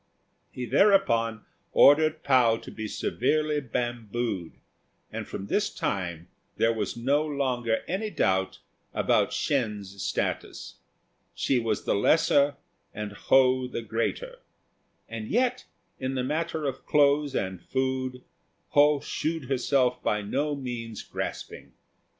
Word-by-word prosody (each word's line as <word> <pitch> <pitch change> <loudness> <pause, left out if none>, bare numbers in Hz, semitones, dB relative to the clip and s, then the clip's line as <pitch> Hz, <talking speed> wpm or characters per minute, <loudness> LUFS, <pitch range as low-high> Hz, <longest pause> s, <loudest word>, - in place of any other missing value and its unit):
He 125 - -5
thereupon 115 - +3 0.3
ordered 155 +2 +5
Pao 125 -5 +4
to - - -10
be 110 -1 -5
severely 150 +7 0
bambooed, 120 - -3 0.6
and - - -5
from 95 - -6
this 205 - 0
time 85 -4 -3 0.3
there 115 0 +3
was 110 0 -3
no 140 +5 +2
longer 130 -6 -1
any 200 +5 -2
doubt 95 - 0 0.4
about - - +2
Shên's 105 -7 -2
status. - - -3 0.6
She 130 - +1
was 115 -3 -1
the - - +1
lesser 145 +5 +3 0.4
and 105 0 -4
Ho 130 +4 +3
the 120 -2 -5
greater; 300 - -3 0.7
and 110 -1 -6
yet 250 +2 +1 0.3
in 130 0 -2
the 130 - -1
matter 155 +2 -2
of 135 -1 -4
clothes 145 -1 +3
and 95 -2 -2
food 130 -1 -2 0.5
Ho 145 0 +4
shewed 155 -4 -3
herself 125 -1 +1
by 105 0 0
no 145 +8 -1
means 120 -5 -6
grasping. - - -6
130 Hz, 120 wpm, -27 LUFS, 115-145 Hz, 0.7 s, ordered